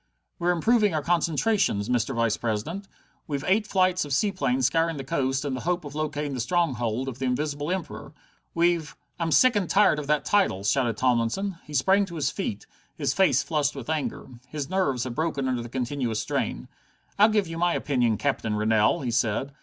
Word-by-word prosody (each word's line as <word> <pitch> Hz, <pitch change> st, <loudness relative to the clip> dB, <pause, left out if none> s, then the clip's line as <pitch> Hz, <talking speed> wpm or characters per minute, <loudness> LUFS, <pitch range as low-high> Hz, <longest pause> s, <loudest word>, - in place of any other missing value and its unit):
"We're 175 Hz, -, 0 dB
improving 205 Hz, +2 st, +3 dB
our 150 Hz, -, -1 dB
concentrations, 170 Hz, -, +1 dB
Mr. 125 Hz, +1 st, 0 dB
Vice 115 Hz, -2 st, +1 dB
president. 120 Hz, -, -3 dB, 0.4 s
We've 140 Hz, -2 st, -3 dB
eight 210 Hz, +3 st, +2 dB
flights 185 Hz, -2 st, +2 dB
of 145 Hz, -2 st, -4 dB
seaplanes 140 Hz, -, +1 dB
scouring 165 Hz, +2 st, +1 dB
the 135 Hz, -, -5 dB
coast 135 Hz, +1 st, -1 dB
in 140 Hz, -, -2 dB
the 130 Hz, -, -3 dB
hope 175 Hz, +2 st, -2 dB
of 145 Hz, -, -8 dB
locating 150 Hz, -1 st, -3 dB
the 130 Hz, -, -4 dB
stronghold 125 Hz, -4 st, 0 dB
of 130 Hz, -1 st, -6 dB
the 130 Hz, -, -2 dB
Invisible 145 Hz, +3 st, -2 dB
Emperor. 140 Hz, -, -4 dB, 0.4 s
We've 170 Hz, -2 st, +1 dB
" -, -, -42 dB
"I'm 165 Hz, -1 st, -1 dB
sick 255 Hz, +8 st, +5 dB
and 195 Hz, -5 st, 0 dB
tired 195 Hz, -6 st, +4 dB
of 145 Hz, -, -6 dB
that 150 Hz, 0 st, +1 dB
title," 190 Hz, -, +2 dB
shouted 115 Hz, +1 st, +1 dB
Tomlinson. 130 Hz, -, 0 dB
He 150 Hz, -, -8 dB
sprang 190 Hz, +9 st, +3 dB
to 170 Hz, -3 st, -10 dB
his 145 Hz, -3 st, 0 dB
feet, 105 Hz, -5 st, -4 dB, 0.3 s
his 140 Hz, -4 st, 0 dB
face 140 Hz, -9 st, +3 dB
flushed 150 Hz, -3 st, 0 dB
with 135 Hz, +2 st, -5 dB
anger. 155 Hz, -2 st, -3 dB, 0.2 s
His 150 Hz, +3 st, -5 dB
nerves 140 Hz, -10 st, +1 dB
had 125 Hz, -, -4 dB
broken 155 Hz, -2 st, -1 dB
under 125 Hz, -2 st, -1 dB
the 120 Hz, -, -8 dB
continuous 125 Hz, -2 st, -2 dB
strain. -, -, -2 dB, 0.5 s
"I'll 210 Hz, +2 st, +7 dB
give 210 Hz, -2 st, +2 dB
you 165 Hz, 0 st, -6 dB
my 175 Hz, 0 st, +2 dB
opinion, 120 Hz, -6 st, +1 dB
Captain 120 Hz, -6 st, -1 dB
Rennell," 105 Hz, +2 st, +2 dB
he 125 Hz, -3 st, -2 dB
said. 115 Hz, +4 st, 0 dB
145 Hz, 195 wpm, -26 LUFS, 125-175 Hz, 0.5 s, I'll